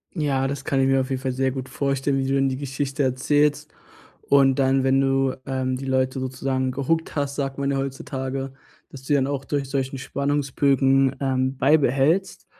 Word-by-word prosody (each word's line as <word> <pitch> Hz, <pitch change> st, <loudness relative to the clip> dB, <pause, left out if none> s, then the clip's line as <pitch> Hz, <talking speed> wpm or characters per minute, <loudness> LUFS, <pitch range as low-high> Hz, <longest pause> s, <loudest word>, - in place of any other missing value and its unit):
Ja, 135 Hz, -4 st, 0 dB
das 140 Hz, 0 st, -5 dB
kann 135 Hz, -3 st, 0 dB
ich 130 Hz, -, +3 dB
mir 135 Hz, 0 st, +3 dB
auf 130 Hz, -, -3 dB
jeden 130 Hz, -1 st, -1 dB
Fall 130 Hz, -1 st, -2 dB
sehr 130 Hz, +1 st, 0 dB
gut 130 Hz, 0 st, -6 dB
vorstellen, 135 Hz, 0 st, -1 dB
wie 135 Hz, -, -1 dB
du 135 Hz, -, 0 dB
dann 135 Hz, 0 st, +2 dB
die 130 Hz, -, -2 dB
Geschichte 140 Hz, 0 st, -3 dB
erzählst. 145 Hz, +3 st, +1 dB, 0.6 s
Und 135 Hz, -1 st, +4 dB
dann, 135 Hz, 0 st, +3 dB
wenn 135 Hz, +1 st, +3 dB
du, 135 Hz, -1 st, +1 dB
ähm, 130 Hz, -1 st, -1 dB
die 135 Hz, -, -7 dB
Leute 130 Hz, 0 st, 0 dB
sozusagen 130 Hz, 0 st, -2 dB
gehookt 160 Hz, +5 st, -1 dB
hast, 140 Hz, -1 st, -2 dB
sagt 135 Hz, -1 st, -3 dB
man 140 Hz, 0 st, 0 dB
ja 140 Hz, -, 0 dB
heutzutage, 135 Hz, 0 st, -4 dB, 0.4 s
dass 135 Hz, -1 st, -11 dB
du -, -, -13 dB
die 145 Hz, -, +3 dB
dann 135 Hz, -2 st, +2 dB
auch 140 Hz, -1 st, -3 dB
durch 140 Hz, -1 st, -2 dB
solchen 135 Hz, 0 st, -2 dB
Spannungsbögen, 135 Hz, -1 st, +1 dB
ähm, 130 Hz, 0 st, 0 dB
beibehältst, 145 Hz, +5 st, +2 dB
135 Hz, 195 wpm, -23 LUFS, 130-140 Hz, 0.6 s, Und